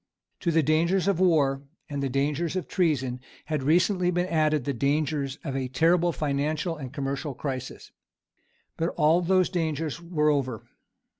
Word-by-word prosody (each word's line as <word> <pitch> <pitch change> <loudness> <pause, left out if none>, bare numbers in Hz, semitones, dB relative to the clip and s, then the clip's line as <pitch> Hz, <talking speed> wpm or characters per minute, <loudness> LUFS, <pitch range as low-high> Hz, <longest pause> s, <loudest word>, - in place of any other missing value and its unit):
To 175 - -1
the 160 -1 +3
dangers 170 +5 +2
of 195 -4 +2
war 145 -7 +3 0.3
and 145 -1 -4
the 135 - -1
dangers 145 +6 -1
of 185 - -2
treason 135 -8 0 0.3
had 155 -3 -2
recently 180 +5 +2
been 175 0 +1
added 155 -4 +1
the 140 - -2
dangers 140 +1 0
of 135 -4 -4
a 130 -1 -1
terrible 165 +6 +3
financial 150 +3 -1
and 135 -5 -7
commercial 140 0 -3
crisis. 130 -3 -6 0.9
But 165 +1 0
all 160 +4 +4
those 185 +1 +3
dangers 160 -2 -2
were 155 -3 +1
over. 130 -6 -2
155 Hz, 155 wpm, -26 LUFS, 140-170 Hz, 0.9 s, all